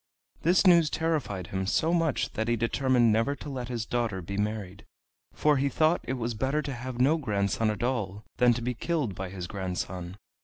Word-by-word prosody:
This 180 +5 +3
news 170 -4 +6
terrified 155 - -1
him 95 0 -1
so 160 - +2
much 165 -5 0
that 110 +1 -2
he 120 - +2
determined 120 +1 +2
never 115 +6 +1
to 150 - -8
let 125 -3 -4
his 120 -2 -3
daughter 115 -5 -1
be 95 +3 -6
married, 105 -1 -3 0.5
for 150 -1 +2
he 140 +1 +1
thought 155 +5 +2
it 130 - -2
was 120 -2 -2
better 135 +7 0
to 140 - -4
have 125 0 -6
no 145 +6 +4
grandson 105 - 0
at 105 +2 -3
all 110 -5 -2
than 125 -1 +5
to 120 - -4
be 125 +1 -1
killed 145 - -1
by 95 0 -5
his 90 -1 -6
grandson. 90 -1 -4
120 Hz, 200 wpm, -28 LUFS, 100-140 Hz, 0.5 s, news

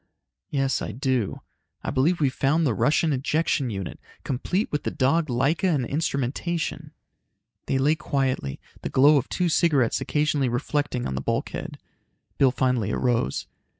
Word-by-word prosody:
"Yes, 135 -2 0
I 110 - -4
do. 130 -3 -1 0.4
I - - -2
believe 150 +6 +2
we've 140 -4 +2
found 155 +4 +2
the 130 - +2
Russian 150 - +2
ejection 140 0 0
unit, 95 -4 -5 0.2
complete 175 - -1
with 150 - -1
the - - -2
dog 155 +5 +1
Laika 135 +8 +1
and 145 -7 +1
instrumentation." 150 +4 -2 0.8
They 135 - +1
lay 140 +3 +3
quietly, 130 - -1 0.2
the - - -3
glow 145 +3 +6
of 135 - -1
two 180 - 0
cigarettes 150 -8 +2
occasionally 150 -3 +1
reflecting 125 +1 -1
on 65 - -2
the 65 - -2
bulkhead. - - -3 0.6
Bill 135 - +6
finally 125 -5 0
arose. 120 - 0
135 Hz, 150 wpm, -25 LUFS, 125-150 Hz, 0.8 s, glow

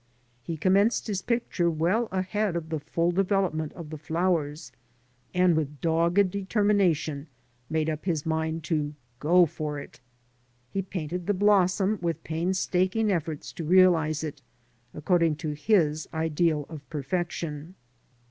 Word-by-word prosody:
He 160 +6 -5
commenced 195 +7 +3
his 200 -4 -2
picture 210 -6 0
well 175 +9 +1
ahead 190 +1 -1
of 165 -2 -4
the 160 -1 -2
full 165 +4 0
development 180 -4 0
of 165 -4 -9
the 155 - -6
flowers, 160 -2 -1 0.6
and 180 -2 +3
with 150 -2 -2
dogged 170 +5 +2
determination 190 -7 +1 0.4
made 160 0 0
up 155 0 -3
his 165 -6 -1
mind 160 0 -1
to 150 -1 -1 0.2
go 175 +5 +5
for 150 -1 -4
it" - - -11 0.7
He 195 - -1
painted 180 -2 -5
the 205 - +2
blossom 200 0 +3
with 170 -2 -2
painstaking 185 +5 0
efforts 160 -4 -3
to 165 - -6
realise 165 -3 +4
it 150 -2 -6 0.5
according 165 0 +1
to 155 0 -4
his 155 -1 +1
ideal 160 -1 0
of 155 -3 -8
perfection. 160 +1 -4
170 Hz, 135 wpm, -27 LUFS, 155-185 Hz, 0.7 s, go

